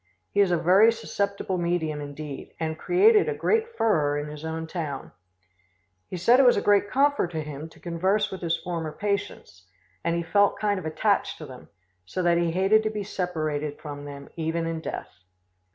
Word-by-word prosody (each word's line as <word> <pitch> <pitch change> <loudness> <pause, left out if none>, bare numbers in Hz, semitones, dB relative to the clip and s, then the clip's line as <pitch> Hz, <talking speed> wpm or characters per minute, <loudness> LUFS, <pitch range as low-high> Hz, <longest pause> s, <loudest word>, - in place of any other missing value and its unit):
He 205 - 0
is 200 -2 +5
a 175 - +2
very 190 +7 +5
susceptible 200 -4 -2
medium 165 -3 -1
indeed, 145 0 -8
and 160 -1 -2
created 415 - +4
a 450 - -2
great 455 +1 0
furore 150 -10 +2
in 145 0 -4
his 150 0 -9
own 160 0 -4
town. 155 -5 -5 1.0
He 185 - -4
said 235 +9 +5
it - - +7
was 245 - +6
a - - +4
great 205 0 +3
comfort 280 -6 +2
to 160 -1 -2
him 150 +1 -7
to - - -19
converse 190 +4 0
with 190 - -6
his 170 -1 0
former 165 -3 -4
patients, 200 - -4 0.4
and 170 0 0
he 170 - -1
felt 200 +4 +3
kind 205 -2 0
of 165 - -5
attached 155 - 0
to - - -8
them, - - -12 0.3
so 180 - -4
that 170 -1 +3
he 170 -1 +1
hated 190 +5 +3
to 215 - -1
be 210 -1 -4
separated 155 -6 -3
from 145 -1 -7
them, 140 -1 -9
even 165 0 -2
in 165 0 -3
death. 160 - -7
170 Hz, 195 wpm, -26 LUFS, 155-205 Hz, 1.0 s, it